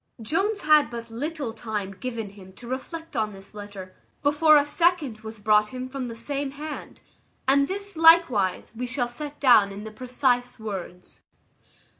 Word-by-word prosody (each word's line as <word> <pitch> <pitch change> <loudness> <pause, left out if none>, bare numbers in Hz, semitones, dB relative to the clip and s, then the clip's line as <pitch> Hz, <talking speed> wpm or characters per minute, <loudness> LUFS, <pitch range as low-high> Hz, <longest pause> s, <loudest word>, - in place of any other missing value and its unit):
Jones 390 - 0
had 305 -4 +5
but 230 -1 -7
little 280 0 -4
time 215 -4 -4
given 225 0 -5
him 190 -2 -14
to 235 +5 -12
reflect 320 +5 -6
on 215 -2 -1
this 195 +1 -13
letter, 200 -3 -9 0.3
before 295 +1 +6
a 290 - +3
second 300 -6 +1
was 220 0 -9
brought 210 0 +3
him 255 +2 -6
from 260 -1 -5
the 230 - -7
same 275 +4 -3
hand; 295 +3 -8 0.5
and 280 +1 +4
this, 400 0 -5
likewise, 320 - +4
we 250 +2 -3
shall 245 0 0
set 290 +4 -8
down 230 -7 +6
in 200 +1 -8
the 220 - -7
precise 250 +1 0
words. 190 -4 -7
245 Hz, 165 wpm, -25 LUFS, 215-290 Hz, 0.5 s, before